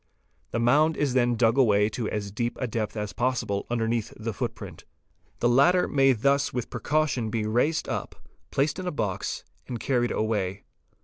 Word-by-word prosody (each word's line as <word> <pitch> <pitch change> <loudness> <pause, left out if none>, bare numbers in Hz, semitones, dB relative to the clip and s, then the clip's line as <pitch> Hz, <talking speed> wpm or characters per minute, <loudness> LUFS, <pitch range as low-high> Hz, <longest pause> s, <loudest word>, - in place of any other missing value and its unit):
'The - - -3
mound 150 +7 +3
is 145 -4 0
then 120 -2 +3
dug 115 +3 +3
away 105 -5 +4
to 110 0 -3
as 100 -2 -3
deep 120 +3 -2
a - - -1
depth 110 -1 -3
as 105 -1 -3
possible 115 -5 -1
underneath 115 -1 -1
the 115 0 -4
footprint. - - -6 0.6
The 120 - +4
latter 140 +9 +4
may 135 -1 +4
thus 140 +4 +1
with 125 -2 -4
precaution 130 -1 0
be 110 0 -1
raised 125 +9 +1
up, - - -4 0.3
placed 145 +5 0
in 185 - -4
a - - 0
box, 100 -10 -3 0.2
and 120 -2 -4
carried 120 -1 +1
away. 100 -3 -1
120 Hz, 175 wpm, -26 LUFS, 110-135 Hz, 0.6 s, away